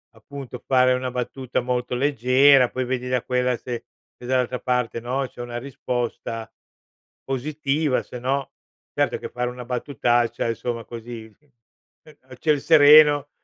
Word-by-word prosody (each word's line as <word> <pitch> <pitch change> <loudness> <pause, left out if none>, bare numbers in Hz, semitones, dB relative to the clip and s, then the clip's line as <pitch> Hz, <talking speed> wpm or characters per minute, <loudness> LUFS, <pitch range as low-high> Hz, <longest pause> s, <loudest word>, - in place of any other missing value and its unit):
appunto 130 +2 -9
fare 130 -1 +4
una 125 0 -2
battuta 125 +1 -3
molto 125 0 -2
leggera, 130 0 +4
poi 130 - -3
vedi 125 0 -3
da 125 -1 0
quella 125 -1 0
se 120 0 -6 0.4
dall'altra 125 0 -1
parte 125 -2 -1
no, 130 +3 -2
c'è 125 - -11
una 120 0 -5
risposta 120 -3 -4 0.7
positiva, 140 +1 -1
se 125 - -9
no 135 +2 -2 0.4
certo - - 0
che - - -7
fare 125 0 -3
una 125 0 -8
battutaccia 120 -2 0
insomma 115 +1 -3
così, 115 -1 -8
ehm 150 -2 -33 0.8
a - - -10
ciel 150 -2 +1
sereno, 145 -2 +7
125 Hz, 140 wpm, -23 LUFS, 120-135 Hz, 0.8 s, sereno